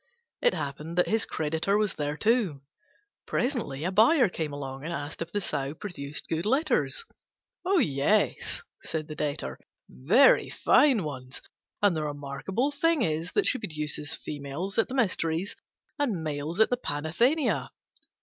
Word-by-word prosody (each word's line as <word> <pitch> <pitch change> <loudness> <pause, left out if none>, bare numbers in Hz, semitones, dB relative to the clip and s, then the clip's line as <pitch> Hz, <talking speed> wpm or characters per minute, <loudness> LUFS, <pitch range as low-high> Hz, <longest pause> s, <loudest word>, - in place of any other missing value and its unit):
It - - +3
happened 150 +4 -5
that 180 - +3
his 220 0 +2
creditor 160 +6 0
was 210 -1 +1
there 145 0 -3
too. 210 - +1 0.6
Presently 235 - -1
a 180 - 0
buyer 230 - +5
came 160 -4 -3
along 135 -1 -6
and 165 - -4
asked 150 -1 -5
if 165 0 -4
the 205 - 0
Sow 140 -4 -2
produced 155 -6 -5
good 165 +1 -1
litters. 295 - +1 0.6
"Yes," 210 - +1 0.2
said 155 -1 -4
the 155 - -6
Debtor, 145 - -3 0.3
"very 215 - +4
fine 265 -10 +4
ones; 130 -4 -6 0.4
and 200 -4 +5
the 155 - -1
remarkable 145 - -2
thing 310 -1 +2
is 160 +2 -1
that 410 - +2
she 260 - +2
produces 150 -6 -2
females 150 +8 -4
at 225 - +3
the 260 - -5
Mysteries 185 -6 0 0.4
and 220 - 0
males 155 +4 -3
at 220 - +5
the 245 - +2
Panathenea." 230 - +1
165 Hz, 150 wpm, -28 LUFS, 145-225 Hz, 0.6 s, buyer